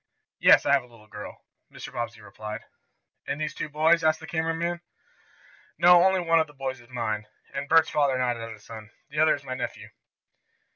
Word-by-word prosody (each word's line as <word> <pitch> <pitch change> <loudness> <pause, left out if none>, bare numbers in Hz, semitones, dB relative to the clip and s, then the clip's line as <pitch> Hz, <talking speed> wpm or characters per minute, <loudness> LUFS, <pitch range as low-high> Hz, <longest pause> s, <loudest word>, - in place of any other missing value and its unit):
"Yes, - - +6
I - - +3
have 140 - +4
a 125 - -17
little 115 -3 -18
girl," 105 -1 -10 0.3
Mr. - - -10
Bobbsey 115 -1 -5
replied. 105 +1 -8 0.7
"And 145 - -3
these 155 0 -2
two - - -5
boys?" 160 +3 +3
asked 155 0 +3
the 160 - -9
camera 160 0 -1
man. 170 +1 -2 1.0
"No, 175 0 +7
only 190 0 +3
one 165 -1 +3
of 160 - +1
the 150 - -16
boys 130 -1 -4
is 120 - -20
mine," 110 -4 -3 0.3
and 140 +1 -4
Bert's 165 0 +5
father 140 -3 +2
nodded 125 -2 -1
at 115 0 -6
his 105 -2 -16
son. 110 -2 -10 0.2
"The 150 - -3
other 155 0 +5
is 145 - -12
my 130 -2 -5
nephew." 130 - -6
140 Hz, 205 wpm, -26 LUFS, 115-160 Hz, 1.0 s, No